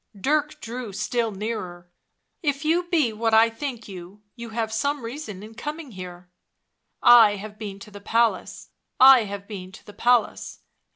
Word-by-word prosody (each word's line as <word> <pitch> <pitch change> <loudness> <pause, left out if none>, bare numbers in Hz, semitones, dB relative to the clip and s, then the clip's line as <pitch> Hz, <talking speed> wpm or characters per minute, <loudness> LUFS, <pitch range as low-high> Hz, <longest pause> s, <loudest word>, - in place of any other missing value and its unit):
Dirk 300 +6 0
drew 235 -1 -6
still 230 +4 -1
nearer. 190 -4 -6 0.3
" - - -52
If 290 -2 -1
you 340 +3 +2
be 300 -10 +2
what 225 +1 +1
I 225 +1 +5
think 240 0 -6
you, 190 +1 -11
you 235 -1 -8
have 220 0 -3
some 280 +4 -1
reason 230 -5 -7
in 220 +1 -11
coming 295 +3 -7
here." 180 -2 -10 0.4
" - - -39 0.2
I 205 - -2
have 210 +1 -9
been 205 -3 -6
to 215 - -12
the 205 0 -11
palace, 230 +2 0 0.3
I 260 -3 +8
have 200 0 -7
been 185 -4 -8
to - - -14
the 205 - -12
palace. 240 +1 0
225 Hz, 175 wpm, -24 LUFS, 200-255 Hz, 0.4 s, I